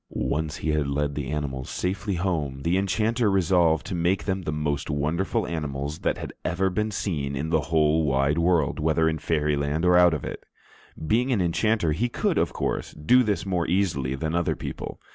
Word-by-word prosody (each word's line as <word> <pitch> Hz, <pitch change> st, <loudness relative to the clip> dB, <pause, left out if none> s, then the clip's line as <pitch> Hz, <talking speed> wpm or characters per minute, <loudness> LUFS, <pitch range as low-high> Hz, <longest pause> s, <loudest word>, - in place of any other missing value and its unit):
Once 75 Hz, 0 st, -2 dB
he 80 Hz, -, -1 dB
had 75 Hz, -2 st, 0 dB
led 70 Hz, +1 st, -1 dB
the 70 Hz, -1 st, -4 dB
animals 70 Hz, -4 st, -3 dB
safely 95 Hz, +2 st, -2 dB
home, 80 Hz, -7 st, -2 dB
the 85 Hz, +4 st, +1 dB
enchanter 110 Hz, +4 st, +1 dB
resolved 85 Hz, -4 st, +3 dB
to -, -, -5 dB
make 90 Hz, +2 st, +1 dB
them 95 Hz, -1 st, -1 dB
the 80 Hz, -4 st, -3 dB
most 75 Hz, -1 st, -2 dB
wonderful 85 Hz, +10 st, 0 dB
animals 75 Hz, -2 st, -4 dB
that -, -, 0 dB
had -, -, -7 dB
ever 95 Hz, +2 st, 0 dB
been 105 Hz, +4 st, -1 dB
seen 75 Hz, -9 st, -2 dB
in 75 Hz, +4 st, -3 dB
the 80 Hz, -2 st, +3 dB
whole 80 Hz, 0 st, +3 dB
wide 70 Hz, +2 st, +1 dB
world, 85 Hz, -4 st, +2 dB
whether 80 Hz, +1 st, +2 dB
in 80 Hz, -1 st, 0 dB
Fairyland 75 Hz, 0 st, 0 dB
or 90 Hz, 0 st, +5 dB
out 90 Hz, -2 st, +6 dB
of 75 Hz, -, -5 dB
it. -, -, -6 dB, 0.6 s
Being 120 Hz, +9 st, +2 dB
an 115 Hz, -, +2 dB
enchanter, 90 Hz, +1 st, +1 dB
he 115 Hz, +11 st, 0 dB
could, -, -, 0 dB
of -, -, +1 dB
course, -, -, -3 dB
do 125 Hz, +13 st, +4 dB
this 105 Hz, -5 st, 0 dB
more 90 Hz, -3 st, -1 dB
easily 80 Hz, -8 st, 0 dB
than 80 Hz, +4 st, -3 dB
other 85 Hz, -1 st, +1 dB
people. -, -, -6 dB
80 Hz, 195 wpm, -25 LUFS, 75-95 Hz, 0.6 s, out